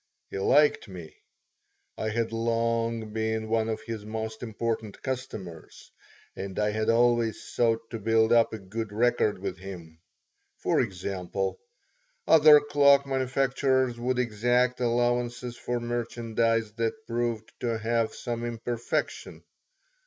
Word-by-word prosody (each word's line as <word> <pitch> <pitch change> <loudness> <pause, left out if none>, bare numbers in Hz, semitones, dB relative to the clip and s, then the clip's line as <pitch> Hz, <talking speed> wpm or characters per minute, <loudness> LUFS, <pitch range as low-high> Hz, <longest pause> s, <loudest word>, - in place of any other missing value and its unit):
He - - -4
liked 145 +8 +3
me. 90 -5 -10 0.8
I 110 - -2
had 115 +1 -1
long 115 -1 -1
been 110 0 -1
one 115 0 +1
of 110 - -3
his 115 -3 -6
most 110 +1 -5
important 115 -2 -3
customers 110 - -6 0.4
and 95 -1 -6
I 105 0 +1
had 110 +1 -1
always 120 -1 +2
sought 115 -1 0
to 115 - -4
build 110 +1 +3
up 115 -1 +4
a 110 - -4
good 105 +2 -5
record 115 -1 +2
with 95 -1 -5
him. 85 -4 -10 0.6
For - - +1
example: 95 -2 -3 0.7
other 155 -1 +8
cloak 140 -1 +4
manufacturers 130 -1 +1
would 125 +1 -1
exact 125 +2 +1
allowances 120 0 0
for 120 0 -3
merchandise 115 -2 -1
that 115 +6 -2
proved 115 -2 -2
to 115 -2 -1
have 115 0 0
some 120 -1 -4
imperfection. 120 0 -3
115 Hz, 125 wpm, -27 LUFS, 110-120 Hz, 0.8 s, other